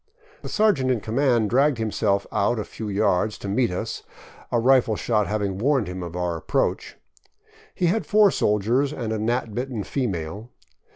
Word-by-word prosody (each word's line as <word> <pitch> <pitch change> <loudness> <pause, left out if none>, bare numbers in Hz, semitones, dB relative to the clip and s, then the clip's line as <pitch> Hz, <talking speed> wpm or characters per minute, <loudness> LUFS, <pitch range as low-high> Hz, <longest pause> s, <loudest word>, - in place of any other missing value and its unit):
The - - -7
sergeant 205 -12 +2
in 125 -3 +1
command 115 -1 +1
dragged 135 +2 +3
himself 105 -3 0
out 105 +4 +1
a 110 - -2
few 110 0 -7
yards 105 0 +1
to - - -7
meet 110 +4 +1
us, 90 - -4 0.5
a 120 - +2
rifle 125 -2 +3
shot 105 -1 0
having 100 -3 -2
warned 135 -1 +2
him 90 +1 -5
of 85 -1 -7
our 90 -2 -2
approach. - - -2 0.8
He 180 - 0
had 200 +6 0
four 210 -2 +5
soldiers 115 +7 +1
and 115 -6 -3
a 110 - -2
gnat 115 0 -1
bitten 125 -2 -3
female. 100 - -4
110 Hz, 170 wpm, -24 LUFS, 100-130 Hz, 0.8 s, four